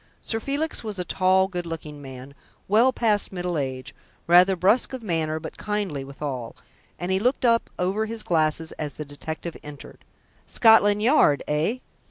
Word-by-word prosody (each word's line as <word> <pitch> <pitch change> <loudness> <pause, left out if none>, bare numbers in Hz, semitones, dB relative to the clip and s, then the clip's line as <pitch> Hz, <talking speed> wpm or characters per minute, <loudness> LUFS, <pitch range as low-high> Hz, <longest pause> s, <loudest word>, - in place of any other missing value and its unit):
Sir 225 - -3
Felix 285 +6 -3
was 215 -3 -5
a 180 - -3
tall, 190 +2 +3
good 175 -2 -5
looking 155 -3 -7
man, 135 0 -10 0.3
well 225 +6 +4
past 215 -5 0
middle 180 -2 -3
age, 130 -3 -4 0.3
rather 180 +3 +6
brusque 200 +9 +2
of 255 -3 -6
manner 160 -5 -1
but 160 - -9
kindly 205 -10 -3
withal, 135 -3 -6 0.4
and 180 +1 -3
he 190 - +2
looked 250 +4 0
up 230 -1 +3
over 195 +5 -1
his 225 0 -5
glasses 160 -1 0
as 150 -3 -4
the 150 - -6
detective 160 +3 -7
entered. 150 -1 -12 0.4
"Scotland 210 -2 +5
Yard, 225 - +4
eh?" 155 +11 0
180 Hz, 165 wpm, -24 LUFS, 150-215 Hz, 0.4 s, rather